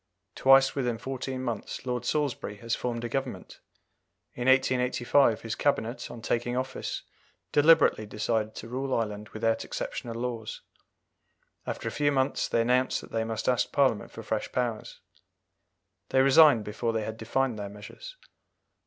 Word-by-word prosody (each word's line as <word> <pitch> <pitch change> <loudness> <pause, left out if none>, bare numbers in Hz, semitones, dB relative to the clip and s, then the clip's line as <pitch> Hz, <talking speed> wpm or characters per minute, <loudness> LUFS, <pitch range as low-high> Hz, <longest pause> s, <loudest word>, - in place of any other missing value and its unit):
Twice 135 0 +5
within 125 -4 -1
fourteen 130 +1 -4
months 120 0 -4
Lord 125 -1 -2
Salisbury 140 -7 -1
has 115 +3 -4
formed 120 -1 -2
a - - -1
Government. 135 +3 -4 0.7
In 120 +1 -3
1885 130 -2 +3
his 115 -1 -4
Cabinet, 125 -4 -1
on 115 - -9
taking 120 +2 -1
office, 130 +1 -4 0.5
deliberately 150 -7 +5
decided 110 +1 -1
to 115 - -7
rule 130 +2 -2
Ireland 105 -1 -3
without 115 0 0
exceptional 115 -1 -5
laws; 115 -2 -4 1.1
after - - -4
a - - -2
few 145 -1 +1
months, 135 -1 +1
they 115 - +1
announced 125 +2 +2
that - - -13
they 115 0 0
must 110 -1 -4
ask 125 -1 +2
Parliament 130 -7 +2
for - - -10
fresh - - -3
powers. 120 -3 -3 1.1
They 130 - +4
resigned 135 -4 +7
before 115 +2 -2
they 110 -1 -1
had 110 +1 -5
defined 120 +1 -1
their 100 -1 -5
measures. - - -11
120 Hz, 150 wpm, -28 LUFS, 115-135 Hz, 1.1 s, resigned